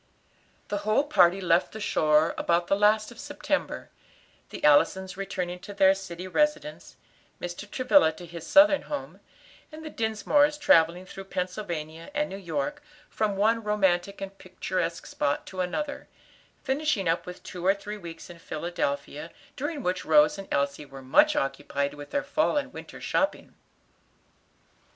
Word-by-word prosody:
The 205 - -1
whole 215 +6 +2
party 190 - +4
left 175 -2 +2
the 220 - -6
shore 155 -6 +2
about 170 0 +1
the 195 - +2
last 215 +2 +3
of 240 - -13
September, - - -3 0.6
the - - -9
Allisons 175 +6 +4
returning 180 -2 -4
to 200 +2 -10
their 190 -1 +6
city 185 -2 -7
residence, 300 +6 -1 0.4
Mr. 175 +4 -6
Travilla 255 - +4
to 175 +2 -11
his 170 -1 -9
Southern 295 0 +6
home, 290 -1 -6 0.5
and 315 +1 -10
the 310 - -6
Dinsmores 285 +7 +2
travelling 170 - +4
through 195 +1 -9
Pennsylvania 170 -4 -5
and 300 0 0
New 195 - -5
York, 160 -7 -3 0.3
from 215 -2 0
one 225 +3 +2
romantic 200 -2 +1
and 195 0 -6
picturesque 185 -2 -3
spot 140 - -1
to 185 - -4
another; 285 +12 -3 0.6
finishing 265 - 0
up 165 +2 0
with 180 - -9
two 180 -1 -8
or 195 +2 +4
three 205 +1 -7
weeks 170 -4 -9
in 175 -1 -12
Philadelphia, 150 -2 -3 0.3
during 295 0 -4
which 180 0 -1
Rose 300 -2 +4
and 195 - -8
Elsie 140 +1 0
were 135 -1 -11
much 130 - +4
occupied 140 +1 -1
with 145 0 -10
their 285 - -1
fall 310 -1 +1
and 290 - -2
winter - - -9
shopping. - - -1
190 Hz, 155 wpm, -27 LUFS, 170-220 Hz, 0.6 s, their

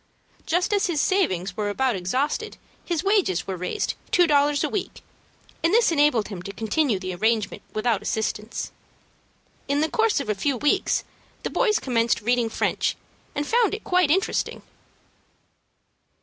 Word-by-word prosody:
Just 355 +5 +1
as 400 -1 +2
his 335 -4 -1
savings 195 - +1
were 210 -1 -1
about 255 +3 +1
exhausted, 270 - -2 0.3
his 345 -2 -2
wages 390 - +2
were 190 - -3
raised 180 - -2 0.2
two 355 - +5
dollars 290 -2 +3
a - - +2
week, 410 - -4 0.6
and 330 - +3
this 465 -6 +4
enabled 290 -9 +3
him 190 -5 -6
to 200 - -6
continue 225 +4 0
the 185 0 -5
arrangement 215 +2 0
without 215 -1 0
assistance. 220 0 -3 1.0
In 285 +1 +1
the 315 - +1
course 450 -5 +2
of 280 - -4
a 210 - +1
few 260 +6 -1
weeks 295 +5 +1 0.4
the - - -3
boys 430 -4 +2
commenced 230 -3 +1
reading 235 +1 +1
French, - - 0 0.4
and 290 - -1
found 455 +2 +2
it 435 - -9
quite 360 -4 +2
interesting. 375 +5 0
280 Hz, 155 wpm, -24 LUFS, 215-355 Hz, 1.0 s, two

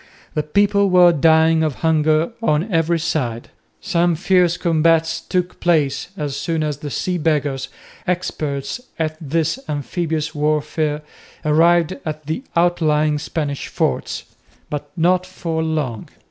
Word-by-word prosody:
The 155 - 0
people 200 +6 +2
were 180 -1 +7
dying 160 +1 +4
of 155 -4 0
hunger 155 +2 +2
on 180 -1 0
every 165 +1 +2
side. 125 -8 -2 0.3
Some 170 0 +1
fierce 180 0 +2
combats 165 -1 +2
took 180 -1 -2
place 150 -5 +1
as 145 -4 -3
soon 165 -2 -1
as 150 -2 -2
the 145 0 -6
Sea 180 +5 -2
Beggars, 145 -4 0 0.4
experts 155 - -2 0.2
at 155 -1 -1
this 160 - -1
amphibious 155 +1 -2
warfare, 150 0 0 0.4
arrived 165 +3 +4
at 155 -1 -5
the 160 - -3
outlying 155 -3 +2
Spanish 145 -3 -3
forts, - - -2 0.5
but 145 0 -4
not 180 +2 +3
for 170 -3 -3
long. 150 -8 -2
160 Hz, 130 wpm, -20 LUFS, 150-170 Hz, 0.5 s, were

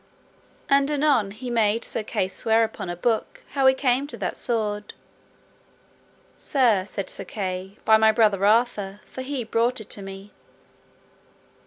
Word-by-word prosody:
And 275 0 +3
anon 285 -8 +2
he 245 +5 -7
made 225 -1 +2
Sir - - -1
Kay 190 -3 -1
swear 225 +4 +2
upon 220 -4 -4
a 175 - -3
book 220 +5 -2
how 275 -2 +3
he 265 - +6
came 265 +1 +1
to - - -8
that - - -3
sword. 210 -3 -2 1.4
Sir, 230 -9 +2
said 200 -1 -5
Sir - - -6
Kay, 190 0 -5
by 220 - +6
my 220 0 +5
brother 215 -4 +2
Arthur, 210 -2 +1
for 260 - -8
he 260 -1 -3
brought 230 +3 0
it 220 - -11
to 205 - -5
me. 195 +1 -9
220 Hz, 155 wpm, -24 LUFS, 200-250 Hz, 1.4 s, he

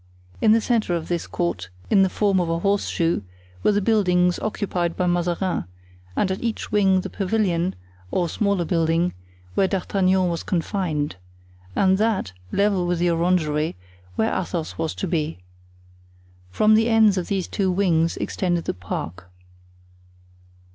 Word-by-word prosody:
In 220 - +5
the 225 +1 +5
centre 215 -7 +1
of 165 -1 -4
this 175 -2 -2
court, 95 - -2 0.2
in 195 - +6
the 190 - +4
form 200 -1 +1
of 175 -2 0
a 165 - +1
horseshoe, 175 - 0 0.4
were - - +3
the 205 -1 +1
buildings 180 -5 +3
occupied 180 -5 -2
by 180 - +1
Mazarin, 175 - 0 0.5
and 190 - +1
at 190 - -3
each 230 -2 -3
wing 190 -2 +3
the - - -6
pavilion 185 -3 0 0.3
(or 175 - 0
smaller 200 0 0
building), 165 +1 +1 0.4
where 190 - +3
D'Artagnan 190 -1 +1
was 170 -1 -2
confined, 165 - -2 0.6
and 190 0 +3
that, 210 - 0 0.2
level 200 -3 +2
with 175 0 0
the 175 +1 +2
orangery, 165 -3 +1 0.4
where 110 - +1
Athos 170 -3 -3
was 160 -1 -2
to - - -3
be. 160 - -1 1.1
From 215 - +3
the 225 +2 +4
ends 220 -3 +5
of 180 -2 -2
these 195 -3 -1
two 195 -2 0
wings 170 -3 +2
extended 175 -3 -1
the - - -1
park. 90 0 -6
180 Hz, 150 wpm, -23 LUFS, 170-200 Hz, 1.1 s, in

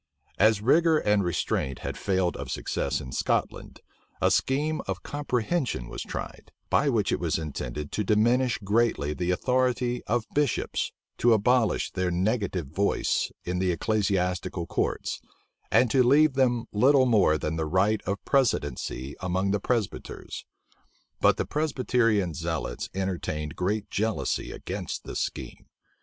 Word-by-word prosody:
As 110 0 +4
rigor 160 +6 +4
and 105 -6 +2
restraint 70 -6 -1
had - - -3
failed 95 -3 0
of - - -6
success - - -2
in 65 - -8
Scotland, - - -2 0.4
a - - +3
scheme 150 +4 +1
of 95 -2 -4
comprehension 135 - -1
was - - -6
tried; - - -7 0.2
by 140 - +3
which 115 -6 +1
it - - 0
was 85 -3 0
intended 75 -2 -5
to 105 - -1
diminish 115 +3 +2
greatly 105 -7 +1
the 90 +2 -2
authority 125 +4 +1
of 115 0 0
bishops, 145 -4 0 0.3
to 120 -1 +5
abolish 115 +1 +2
their 95 -1 -1
negative 95 - 0
voice 95 +9 0
in 90 0 -2
the 95 -1 +2
ecclesiastical 90 -3 0
courts, - - -2 0.5
and 125 -3 +4
to 135 - +4
leave 140 +4 +5
them 125 -3 +2
little 130 +5 +5
more 105 -10 +4
than 75 +1 -3
the 80 -1 -2
right 100 +5 +2
of 100 +2 -3
precedency 75 - 0
among 95 +1 0
the 105 - +1
Presbyters. 115 -1 -3 0.7
But - - +4
the - - -1
Presbyterian 125 - +1
zealots 80 -6 -3
entertained 85 -6 -3
great 105 +3 -1
jealousy 110 +1 -1
against - - -5
this - - -5
scheme. - - -5
105 Hz, 140 wpm, -27 LUFS, 90-125 Hz, 0.7 s, to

